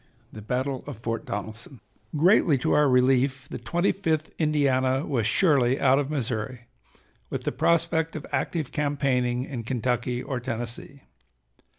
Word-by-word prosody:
III - - -35
THE 110 - -8
BATTLE 130 +4 -2
OF 145 -6 -6
FORT 115 0 -4
DONELSON 110 +5 -6 0.4
Greatly 170 -2 +4
to 125 - -1
our 150 -1 +4
relief 130 +1 +2
the - - -6
Twenty 175 +3 +1
fifth 160 -5 -2
Indiana 140 -3 +2
was 120 -6 0
surely 135 -7 +3
out 135 0 +4
of 145 -1 -2
Missouri, 125 -3 -3 0.7
with - - -4
the - - -1
prospect 165 0 +1
of 155 - -5
active 160 -6 -2
campaigning 130 -4 0
in 130 -5 -5
Kentucky 125 +1 -1
or 130 -3 -3
Tennessee. 120 +3 -6
130 Hz, 150 wpm, -26 LUFS, 125-150 Hz, 0.7 s, Greatly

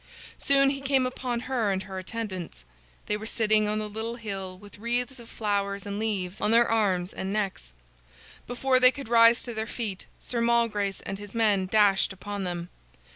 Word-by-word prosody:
Soon 275 0 +4
he 275 -1 -5
came 270 -1 +2
upon 250 -1 -3
her 240 -6 0
and 190 0 -1
her 190 -1 -6
attendants. 185 - -6 0.4
They 210 - 0
were 220 +1 -5
sitting 215 -1 +2
on 210 +1 0
a - - -3
little 220 +2 -4
hill, 195 -5 -6
with 205 +1 -14
wreaths 245 +3 -1
of 235 - -13
flowers 200 -2 -2
and 200 0 -4
leaves 200 -4 -2
on 210 - +2
their 235 +1 +5
arms 195 -5 +1
and 190 - -4
necks. 195 - -3 0.7
Before 255 +1 +2
they 255 0 +8
could 275 -3 -9
rise 230 0 +6
to 240 - -6
their 220 0 -3
feet, 210 -6 -4
Sir 235 -2 -3
Malgrace 230 -4 +1
and 195 - -6
his 205 +1 -10
men 205 -4 +2
dashed 200 -1 +3
upon 200 +1 -5
them. 175 -1 -4
215 Hz, 185 wpm, -27 LUFS, 195-235 Hz, 0.7 s, they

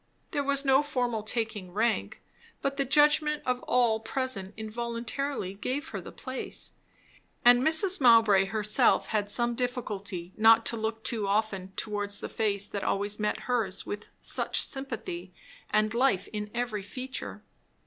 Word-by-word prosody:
There 290 -4 0
was 280 0 0
no 270 +1 +5
formal 245 -6 -1
taking 215 -4 -3
rank, 220 +2 0 0.4
but 275 0 -1
the 275 - +1
judgment 300 +2 +4
of 250 -1 0
all 235 -3 +3
present 225 -4 -3
involuntarily 235 0 -3
gave 260 +10 -3
her - - -5
the - - -10
place. 260 -1 -5 0.7
And 245 0 +8
Mrs. 320 +5 +4
Mowbray 225 -6 +6
herself 210 +1 +2
had 205 -2 0
some 240 +3 +2
difficulty 210 -7 -4
not 225 +1 +6
to - - 0
look 220 0 -3
too 215 -4 -1
often 195 -2 -1
towards 205 -1 -2
the - - -6
face 205 -3 -1
that 200 -1 -5
always 205 +1 -1
met 210 0 -1
hers 225 -7 -1
with 205 0 -6
such - - 0
sympathy 220 -10 -5 0.4
and 215 +1 +2
life 235 -6 +2
in 210 0 -4
every 235 -3 -2
feature. 255 +7 -5
225 Hz, 150 wpm, -29 LUFS, 205-255 Hz, 0.7 s, And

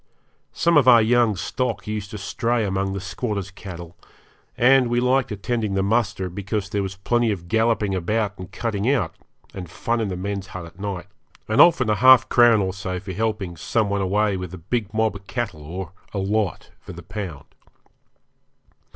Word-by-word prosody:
Some 170 -2 +2
of 135 -4 +4
our 120 -2 +9
young 115 -1 +3
stock 120 +7 -3
used 105 -1 -4
to 105 - -7
stray 115 +3 -1
among 95 0 -1
the 100 - -3
squatters' 100 0 -4
cattle, 90 -4 -9 0.6
and 130 +1 +5
we 120 0 +1
liked 125 0 +1
attending 105 0 -2
the 95 - +1
muster 100 -3 0
because 100 +2 -4
there 100 -2 0
was 95 -1 -4
plenty 120 +4 +1
of 85 -4 -5
galloping 110 -1 +1
about 105 +3 -1
and 95 - -8
cutting 110 -1 -2
out, 110 -12 0 0.4
and 90 -3 -7
fun 115 +7 -2
in 110 - -1
the 95 -2 -4
men's 100 +1 -4
hut 90 -2 -7
at 85 +3 -15
night, 100 -3 -4 0.4
and 110 +6 +4
often 145 -8 +5
a 105 - +3
half 130 +4 +6
crown 120 -3 +5
or 95 -1 -1
so 95 -1 -4
for 95 0 -7
helping 105 -4 -2
some 105 +5 -1
one 100 -1 0
away 100 +2 +1
with 90 -2 -6
a - - -9
big 105 +5 -3
mob 110 -1 0
of 100 - -19
cattle 120 -11 -4
or 85 +3 -6 0.2
a - - -1
lot 100 -1 -1
for - - -10
the 85 - -10
pound. 90 -5 -6
100 Hz, 190 wpm, -23 LUFS, 95-115 Hz, 0.6 s, our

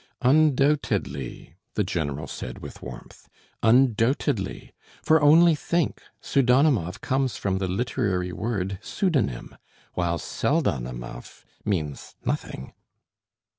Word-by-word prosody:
"Un 150 +3 +5
doubted 135 - +2
ly," 70 +4 -8 0.2
the 105 - +2
general 80 -5 -2
said 60 -2 -7
with - - -10
warmth, 60 -1 -11 0.3
"un 125 +2 +5
doubted 120 +3 +1
ly; 95 0 -6 0.3
for 160 -1 +4
only 165 +3 +7
think, 170 +2 -1 0.2
Pseudonimov 125 - +2
comes 130 -1 0
from 95 -1 -1
the 95 - -1
literary 95 -3 -1
word 95 -2 -3
pseudonym, 130 - -1 0.4
while 85 -1 0
Pseldonimov 65 - -2 0.2
means 80 -9 -3
nothing." 65 - -3
105 Hz, 110 wpm, -25 LUFS, 85-135 Hz, 0.4 s, only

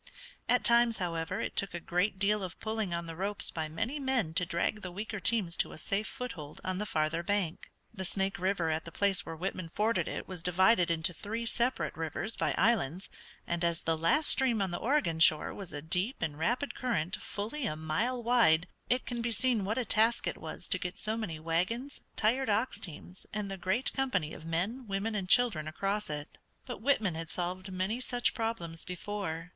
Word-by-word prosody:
At - - +4
times, 235 -1 +5
however, 165 -3 -2
it - - -3
took 195 -3 0
a - - -2
great 180 +4 0
deal 205 +2 +2
of 185 -1 -6
pulling 220 -3 -2
on 170 0 -2
the 165 -1 -6
ropes 200 +4 0
by 160 -1 -3
many 225 - -2
men 260 - +1
to 180 +1 +2
drag 190 +6 0
the 180 - -5
weaker 205 +3 -4
teams 190 -5 +1
to - - 0
a - - -9
safe 200 +6 -1
foothold 170 -13 -6
on 185 0 -2
the 210 - -2
farther 155 0 +1
bank. 185 -2 -1 0.2
The 190 - -4
Snake 195 +1 0
River 180 -3 +1
at 155 0 -1
the 170 - -7
place 200 0 +1
where 165 - -4
Whitman 180 0 -3
forded 215 +6 +1
it - - -4
was 185 -3 -5
divided 180 +1 +4
into 165 +1 +1
three 225 +6 -4
separate 240 +2 0
rivers 165 +7 -3
by - - 0
islands, 190 - +2 0.3
and 170 0 -1
as 170 -1 +1
the 165 - +1
last 220 - +3
stream 255 -4 +4
on 195 -2 0
the 175 - -2
Oregon 220 - +1
shore 155 -2 +4
was 195 -4 -7
a 145 -1 -6
deep 180 +10 0
and 155 -2 -1
rapid 240 - 0
current 195 - -1
fully 225 +6 -3
a 155 - -2
mile 210 +11 -1
wide, 225 -9 +5 0.2
it 250 +1 +2
can 240 -1 -3
be 235 - 0
seen 230 -3 +1
what 215 +5 -1
a 255 - 0
task 225 +2 +3
it - - -2
was - - -5
to - - +3
get 180 -1 -4
so 215 0 -1
many 190 -9 -4
wagons, 185 - -1
tired 240 +4 +2
ox 215 +5 +1
teams, 175 +2 -9
and 210 -2 -3
the - - -2
great 190 +8 0
company 200 - 0
of 155 - -9
men, 205 +10 -1
women 200 +3 -1
and 195 -3 -2
children 220 -12 +4
across 195 +5 -1
it. 150 0 -6 0.3
But - - -6
Whitman 220 - +2
had 165 0 -5
solved 185 +2 -3
many 190 +6 -1
such 245 -2 +1
problems 225 -8 -3
before. 180 -3 -4
195 Hz, 205 wpm, -32 LUFS, 170-225 Hz, 0.3 s, times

